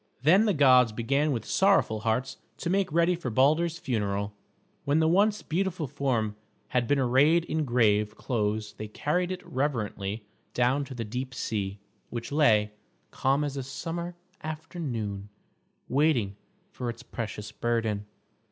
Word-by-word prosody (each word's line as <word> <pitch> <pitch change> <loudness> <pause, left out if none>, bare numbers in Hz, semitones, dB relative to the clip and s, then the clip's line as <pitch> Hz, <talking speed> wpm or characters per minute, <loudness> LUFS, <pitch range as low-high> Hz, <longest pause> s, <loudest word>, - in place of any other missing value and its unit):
Then 185 +9 +6
the 210 - +3
gods 130 -5 +6
began 140 +7 +1
with 115 -5 -2
sorrowful 190 - +3
hearts 115 +4 -1 0.2
to 170 - -2
make 190 -2 +1
ready 170 +2 +3
for 170 -7 -4
Balder's 155 +8 +3
funeral. 105 -8 -2 0.5
When 140 +2 +2
the 160 0 +3
once 205 +5 +3
beautiful 180 -1 -1
form 120 -6 -1 0.3
had 125 -2 +1
been 145 - +3
arrayed 140 +6 +4
in 155 -2 -1
grave 105 -4 +2
clothes 105 -3 -1
they 110 - -4
carried 175 - -1
it 185 - -6
reverently 110 -6 -2 0.3
down 130 +3 +2
to 135 - -9
the 115 -2 -4
deep 125 +4 -5
sea, 100 -5 -2 0.3
which 120 +2 -5
lay, 110 -9 +4 0.4
calm 135 +2 +1
as 145 -2 -3
a 135 - -2
summer 165 +7 -5 0.3
afternoon, 130 - -5 0.6
waiting 130 -8 +2 0.4
for 125 -8 -4
its 120 +1 -7
precious 105 -4 -6
burden. 110 -2 -1
130 Hz, 145 wpm, -28 LUFS, 110-155 Hz, 0.6 s, Then